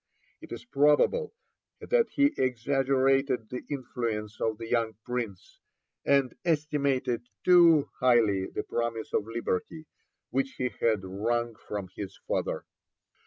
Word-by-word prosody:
It - - -12
is - - -7
probable 190 - +3 0.5
that 485 -1 +2
he 285 +1 +3
exaggerated 135 -1 +1
the 125 - -5
influence 115 -6 -4
of 110 -1 0
the 115 0 -7
young 115 -2 0
Prince, 120 -7 -5 0.4
and 140 -2 +3
estimated 140 -7 0
too 170 -5 +6
highly 115 -7 +3
the - - -4
promise 115 -1 -3
of 105 - 0
liberty 120 - -3 0.5
which 135 +1 0
he 125 -1 -2
had 110 -4 +2
wrung 115 +5 -1
from 100 -4 -6
his 100 -2 -7
father. - - -2
125 Hz, 120 wpm, -28 LUFS, 115-140 Hz, 0.5 s, too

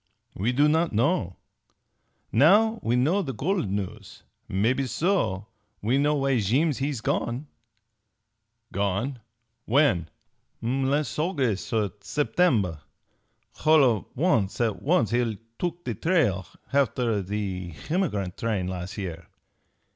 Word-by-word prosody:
We 105 +6 0
do 145 +4 +4
not 160 0 +2
known. 115 - +1 1.0
Now 210 - +5
we 115 +2 +1
know 155 +11 +2
the 135 - -4
gold 170 - -1
news. 100 -1 -5 0.2
Maybe 120 +8 +1
so 125 - 0 0.3
we 120 +6 +1
know 150 +1 +2
why 135 -3 +1
Jeem 130 - +2
he's 135 -3 -2
gone!" 120 +5 -1 1.3
"Gone? 100 +7 -1 0.5
When?" 110 - +3 0.5
"Las' 135 +4 0
H'august 140 - -1 0.3
Settemb. 110 - +1 0.8
H'all 155 -1 +5
of 115 -5 +2
an' 140 - +3 0.2
at 105 -5 -3
once 140 - +2
he'll 120 -2 +1 0.2
took 175 0 -3
the 120 - -1
trail 115 - +1 0.2
h'after 125 -6 +1
the 95 -2 -3 0.2
h'emigrant 105 - -1
train 110 -5 -1
las' 90 +2 -5
year. 85 -4 -5
125 Hz, 115 wpm, -26 LUFS, 100-150 Hz, 1.3 s, Now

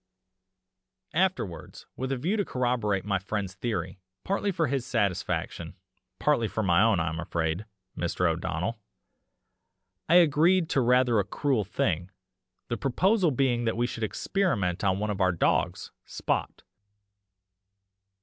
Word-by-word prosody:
"Afterwards, 160 - -2
with 130 +1 -3
a 135 - 0
view 170 - 0
to 205 - +1
corroborate 120 - -1
my 100 -2 0
friend's 100 0 -3
theory, 95 -3 -3 0.2
partly 200 +1 0
for 170 -3 0
his 135 -3 -1
satisfaction, 100 -7 -2 0.4
partly 145 -7 +2
for 110 - -2
my 90 -1 +4
own, 110 -5 +4
I 80 - 0
am 80 0 -5
afraid, 85 +3 -2 0.3
Mr. 85 +1 0
O'Donnell, 85 +6 -2 1.3
I 170 - +5
agreed 170 +1 +4
to 135 - +3
rather 125 -2 +4
a - - +2
cruel 125 +3 0
thing 90 -2 -1 0.6
the 120 - -2
proposal 185 - +2
being 125 -3 +1
that 115 0 0
we 120 - +2
should 115 -2 -4
experiment 110 - -1
on 95 -1 +2
one 105 +1 -1
of 100 -1 -3
our 95 -1 +4
dogs 85 - 0
Spot. - - -3
115 Hz, 140 wpm, -27 LUFS, 95-140 Hz, 1.3 s, I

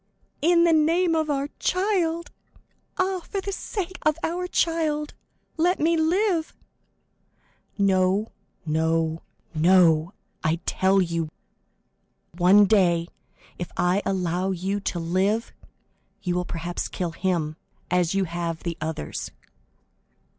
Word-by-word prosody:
"In 340 +2 +4
the 340 -1 +4
name 330 +3 +3
of 315 -1 0
our 280 0 -1
child! 360 -3 0 0.7
Ah, 375 0 0
for 395 +3 -5
the 395 +1 -4
sake 375 -1 -4
of 310 0 +2
our 360 +2 -1
child, 315 -4 0 0.4
let 350 +3 +2
me 330 +2 +3
live!" 335 +1 +1 1.2
50167m 200 - +2
"No, 190 +2 +2 0.3
no, 160 +1 0 0.3
no, 165 +1 +4 0.3
I 155 +1 +2
tell 190 0 +3
you; 170 -2 -2 1.1
one 190 +4 +6
day, 175 -5 +3 0.5
if 175 - -5
I 180 +3 +2
allow 180 0 -1
you 190 +2 -2
to 195 - -3
live, 190 +7 0 0.7
you 180 - 0
will 180 0 -1
perhaps 175 +1 -4
kill 175 -2 -3
him, 165 -3 -1 0.4
as 180 0 +2
you 195 - +2
have 170 -1 -4
the 170 -2 -4
others!" 155 - -4
195 Hz, 120 wpm, -25 LUFS, -, 1.2 s, one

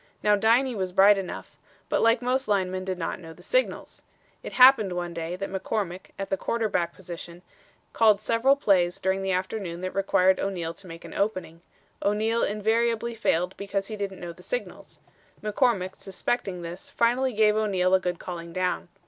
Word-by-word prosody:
Now 210 0 +5
Diney 235 +5 +3
was 190 -4 -3
bright 195 +2 +6
enough, 190 - -7 0.3
but - - +1
like 230 +2 +3
most 260 +2 0
linemen 185 -2 0
did 185 -1 -3
not 170 - -3
know 165 -2 -10
the - - -16
signals. - - -1 0.4
It - - -8
happened 250 -7 +7
one 175 -1 -4
day 165 +1 -4
that 195 +1 -5
McCormick, 190 -1 -3
at 195 - -5
the 195 - +1
quarterback 205 -6 -1
position, 175 -1 -9 0.5
called 215 -3 +5
several 230 +5 +3
plays 185 -9 +2
during 190 +1 0
the 195 - -2
afternoon 185 -1 -3
that 185 0 -4
required 190 -1 +3
O'Neal 175 -4 -2
to 185 +3 -13
make 165 0 -10
an - - -9
opening. 185 -5 -2 0.4
O'Neal 220 +3 +1
invariably 230 +3 0
failed 180 -5 0
because 200 0 -3
he 215 - -4
didn't 200 -2 -5
know 175 -1 -6
the - - -16
signals. - - -6 0.4
McCormick, 210 -3 +1
suspecting 195 -2 -3
this, 170 +2 -8
finally 250 +3 +1
gave 210 0 +4
O'Neal 190 -4 +1
a 190 - +6
good 180 -1 -2
calling 170 -1 -7
down. 180 +1 -1
195 Hz, 175 wpm, -26 LUFS, 180-220 Hz, 0.5 s, happened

